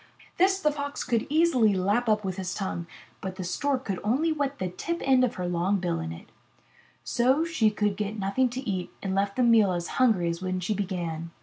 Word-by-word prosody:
This 380 +2 +3
the 300 -4 +2
Fox 285 -1 -4
could 230 -2 0
easily 285 -10 +3
lap 205 +6 +1
up 210 -1 +2
with 190 -1 -3
his 185 -1 -3
tongue, 180 -4 -3 0.3
but 190 -1 -5
the 185 - -5
Stork 265 +8 -1
could 195 -3 -2
only 270 +10 +1
wet 285 -2 -1
the 185 - -2
tip 335 - -4
end 260 -1 +5
of 250 - 0
her 180 -1 -3
long 175 +3 +1
bill 175 -2 -1
in 80 0 -4
it. 80 - -9 0.8
So 260 +7 +2
she 310 -10 +2
could 210 -1 0
get 210 +1 -3
nothing 205 +6 +1
to 250 +1 -6
eat 185 -3 -2
and 190 -1 -1
left 200 +1 0
the 255 - +2
meal 225 -5 +5
as 175 -1 -3
hungry 215 -9 +4
as 170 +1 -4
when 185 0 -2
she 180 +4 -1
began. 175 -5 -3
210 Hz, 220 wpm, -27 LUFS, 185-260 Hz, 0.8 s, end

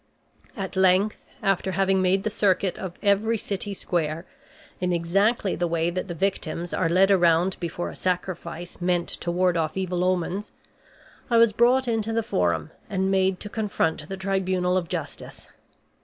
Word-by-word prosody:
At 195 -2 -4
length 190 +2 +3 0.2
after 195 -1 +1
having 195 +1 +2
made 190 +1 +2
the 215 - -1
circuit 195 -3 +1
of 185 -2 -5
every 210 +3 +2
city 200 0 -4
square, 165 -2 -2 0.5
in 180 0 0
exactly 195 +5 +1
the 175 - 0
way 165 0 0
that 185 +2 -3
the 175 - -5
victims 175 -2 -2
are 165 - +1
led 190 +3 +4
around 175 0 +4
before 175 0 -4
a - - -11
sacrifice 175 -1 -4
meant 175 -1 +1
to 175 - -4
ward 180 0 +2
off 160 +1 -1
evil 180 -2 -1
omens, 185 +2 -1 0.8
I 235 - +4
was 230 -2 +5
brought 245 +4 +3
into 225 -1 0
the 230 0 +1
forum 85 - 0 0.2
and 190 -1 0
made 190 -1 +2
to - - -5
confront 195 -8 -1
the 195 - -4
tribunal 185 -1 0
of 175 -3 -1
justice. - - -6
185 Hz, 165 wpm, -25 LUFS, 175-195 Hz, 0.8 s, was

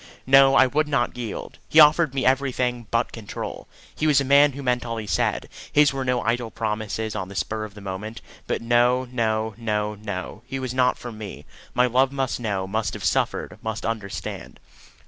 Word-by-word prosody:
No; 135 +1 +6
I 130 - +7
would 150 +4 +1
not 145 -3 0
yield. 120 -4 -6
He 160 - +5
offered 150 -1 +6
me 135 - 0
everything 125 -3 +1
but 115 +1 0
control. 110 -3 -7 0.3
He 155 - 0
was 145 -3 +5
a 140 - 0
man 140 +1 +5
who 140 +1 -7
meant 125 -1 +1
all 115 -1 -4
he 110 - -4
said. 85 -7 0 0.2
His 145 -1 +5
were 135 -1 -2
no 125 -1 0
idle 120 +1 0
promises 110 -1 -3
on 95 - -4
the 100 - -10
spur 110 +2 -2
of 105 -1 -12
the 105 - -10
moment. 100 +3 -6 0.3
But - - -2
no, 120 +2 +3
no, 110 -2 0
no, 105 -2 -1
no, 105 0 -6
he 135 - -4
was 130 -2 -4
not 125 -1 +2
for 120 - -7
me. 105 -3 -8 0.3
My 125 - +4
love 130 +2 +2
must 135 -3 -2
know, 100 -5 -2
must 110 +3 -2
have 100 -3 -6
suffered, 85 - -1
must 110 0 -4
understand. 110 -3 -5
120 Hz, 200 wpm, -24 LUFS, 110-130 Hz, 0.3 s, I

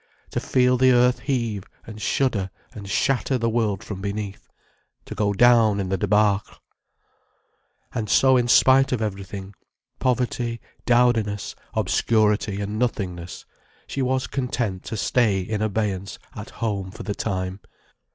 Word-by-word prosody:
To - - -1
feel 125 0 +2
the 130 +1 +5
earth 125 +1 +4
heave 115 -7 -2 0.2
and 110 -1 -9
shudder 105 -9 0 0.2
and 100 -2 -9
shatter 135 +3 +1
the 115 -1 0
world 110 -4 0
from 95 -2 -7
beneath. 100 0 -5 0.6
To - - -7
go 105 -1 0
down 110 -1 +5
in 95 -2 -2
the 95 - 0
débâcle. 105 0 +1 1.4
And 110 -2 -3
so, 130 +4 +5
in 120 -1 +2
spite 135 +2 +5
of 125 - 0
everything, 100 -1 -5 0.5
poverty, 120 -2 -1 0.3
dowdiness, 120 -4 +2 0.2
obscurity, 105 -2 +1
and 105 +2 -3
nothingness, 90 -8 -3 0.4
she 135 - -4
was 130 0 0
content 120 -8 -2
to 110 - -4
stay 105 -2 +2
in 105 +3 -3
abeyance 100 -3 -2 0.2
at - - -7
home 100 -4 -3
for 105 - -9
the 105 - -3
time. 95 -2 -3
110 Hz, 140 wpm, -23 LUFS, 100-125 Hz, 1.4 s, the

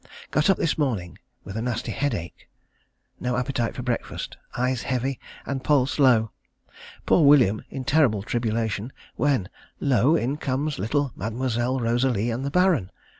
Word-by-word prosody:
Got 155 +4 +2
up 195 - +4
this 160 - 0
morning 110 - -2 0.2
with 95 - -8
a 110 - -2
nasty 120 -1 -2
headache. 110 - -3 0.7
No 125 0 -1
appetite 125 -2 -1
for 125 - -5
breakfast. 120 -1 -3 0.2
Eyes 125 0 0
heavy, 130 +1 -2 0.3
and 135 -2 -3
pulse 145 -1 +2
low. 115 -6 +4 0.7
Poor 170 - +4
William 130 -8 +5
in 135 - -5
terrible 125 -8 +3
tribulation, 115 0 -1 0.2
when 130 -7 +1 0.3
lo! 135 +2 +3
in 140 -1 0
comes 140 +1 -2
little 135 +7 0
Mademoiselle 120 +4 -1
Rosalie 120 -1 +1
and 120 +3 -3
the 140 - -1
Baron. 180 - +2
125 Hz, 145 wpm, -25 LUFS, 115-140 Hz, 0.7 s, William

